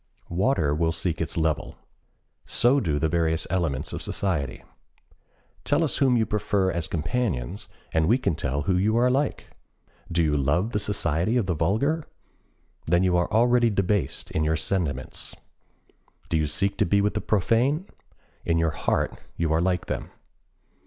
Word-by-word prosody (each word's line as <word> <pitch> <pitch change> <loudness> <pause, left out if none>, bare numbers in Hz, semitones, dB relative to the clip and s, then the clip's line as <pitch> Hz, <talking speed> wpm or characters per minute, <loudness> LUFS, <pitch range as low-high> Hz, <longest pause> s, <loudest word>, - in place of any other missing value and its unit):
Water 85 - +1
will 80 +2 +1
seek 85 0 -2
its 85 - -3
level. 80 -2 -1 0.7
So 130 +4 +3
do 80 - 0
the 80 - +1
various 80 0 0
elements 80 -5 -1
of - - -4
society. 80 -10 -2 1.0
Tell 145 +3 +2
us 150 - 0
whom 130 -3 +3
you 110 - +2
prefer 100 -3 0
as 85 -2 -2
companions 90 - -2 0.3
and 80 0 +2
we 115 +6 +4
can 130 - 0
tell 70 -2 -2
who 90 +4 +1
you 110 +5 +2
are 125 +1 +4
like. 140 +3 -1 0.6
Do 85 0 +2
you 75 -2 +1
love 75 - +1
the 105 - 0
society 100 +1 0
of 115 - +1
the 90 - 0
vulgar? 110 - 0 0.8
Then 85 +2 +3
you 90 -1 +2
are 85 0 +1
already 120 +2 +4
debased 100 -6 -1
in 80 - 0
your 80 +1 +1
sentiments. 80 -6 -2 0.9
Do 80 - +1
you 75 -1 +1
seek 100 +7 0
to - - +4
be 100 - +3
with 105 +1 +1
the - - -2
profane? 120 - +1 0.6
In 85 -1 +1
your 80 -1 +2
heart - - 0 0.2
you 80 -2 +1
are 80 - +2
like 90 0 0
them. - - -4
90 Hz, 165 wpm, -25 LUFS, 80-110 Hz, 1.0 s, we